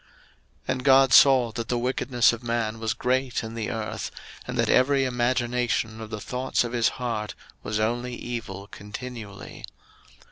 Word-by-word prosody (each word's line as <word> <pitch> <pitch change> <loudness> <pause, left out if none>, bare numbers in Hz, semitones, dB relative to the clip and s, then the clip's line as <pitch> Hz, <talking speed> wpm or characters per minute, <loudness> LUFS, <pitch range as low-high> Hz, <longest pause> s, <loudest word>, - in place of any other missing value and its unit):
01:006:005 - - -30 0.6
And 130 0 -1
God 135 -1 +6
saw 130 -4 +7
that 115 0 -5
the 125 - 0
wickedness 125 -1 +2
of 115 - -6
man 115 -2 -2
was 110 -1 -1
great 130 0 0
in 110 0 -6
the 115 -1 -3
earth, 110 -3 -4 0.4
and - - -4
that - - +2
every 135 +1 +4
imagination 120 -2 0
of 110 - -7
the 110 -1 -5
thoughts 125 +5 -1
of 120 - -4
his 120 -2 +3
heart 110 -4 -3 0.3
was 110 0 -2
only 120 +3 -1
evil 115 -6 -6
continually. 105 +1 -9
120 Hz, 165 wpm, -25 LUFS, 110-125 Hz, 0.6 s, saw